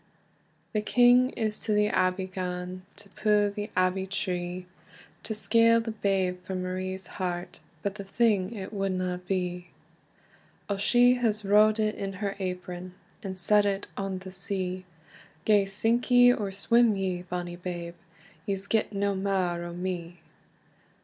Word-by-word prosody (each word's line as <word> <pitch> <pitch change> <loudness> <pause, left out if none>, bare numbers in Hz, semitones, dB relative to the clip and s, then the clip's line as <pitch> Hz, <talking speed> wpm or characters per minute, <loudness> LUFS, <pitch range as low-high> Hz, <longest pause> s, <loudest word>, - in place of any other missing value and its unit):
The 215 - +1
king 245 +3 +5
is 215 -2 -1
to 215 - -1
the 210 0 +3
Abbey 185 0 +1
gane, 185 0 -5
To - - -15
pu 210 -1 +2
the 205 +1 -5
Abbey 185 +1 +1
tree, 180 -2 -3 0.6
To 220 +1 -4
scale 230 +1 +4
the 225 0 -3
babe 190 -4 0
frae 190 +1 -5
Marie's 185 +1 -3 0.2
heart; 175 -1 -3 0.2
But 200 - -1
the 200 -1 -7
thing 200 -1 +1
it 205 -2 -7
wadna 185 -2 -1
be. 180 -2 -2 1.0
O 200 - -1
she 245 +5 +5
has 215 -4 0
rowd 210 +2 +5
it 215 0 +1
in 195 0 -4
her 200 +1 -3
apron, 180 -1 -5 0.3
And 190 -4 -6
set 210 +3 +4
it 200 -1 -1
on 195 -1 -3
the 185 0 -9
sea: 185 -1 -4 0.6
"Gae 205 -2 +4
sink 225 +6 0
ye, 245 0 +7
or 205 -5 -3
swim 230 +3 +3
ye, 185 -2 -2
bonny 175 -1 -5
babe, 175 -1 -5 0.5
Ye's 195 -1 -2
get 215 +1 0
na 200 0 0
mair 190 -3 -1
o 175 - -6
me." 175 -1 -5
195 Hz, 150 wpm, -28 LUFS, 185-210 Hz, 1.0 s, ye